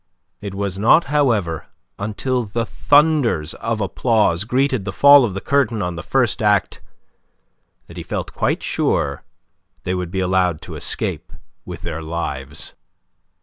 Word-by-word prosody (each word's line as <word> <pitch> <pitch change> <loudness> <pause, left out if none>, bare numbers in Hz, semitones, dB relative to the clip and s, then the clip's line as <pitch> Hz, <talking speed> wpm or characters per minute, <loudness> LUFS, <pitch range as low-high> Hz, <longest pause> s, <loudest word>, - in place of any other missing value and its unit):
It 100 -2 -7
was 100 -1 -3
not, 120 +10 +5
however, 110 - +1 0.3
until 115 +5 -2
the 115 +3 -2
thunders 145 - +2
of 115 -1 -3
applause 105 -2 +1
greeted 130 -1 0
the 95 - -4
fall 140 +7 +7
of 105 -6 -2
the 100 - -4
curtain 120 -7 +1
on 90 -1 -3
the 85 - -5
first 125 -6 +1
act 105 -2 +1 1.0
that - - -13
he - - -4
felt - - -5
quite - - -1
sure - - -1 0.6
they 90 - -2
would 90 -2 -3
be 95 +2 -3
allowed 90 -3 +1
to - - -8
escape - - -3 0.3
with - - -8
their 80 - -4
lives. 85 +1 -5
105 Hz, 145 wpm, -20 LUFS, 90-125 Hz, 1.0 s, fall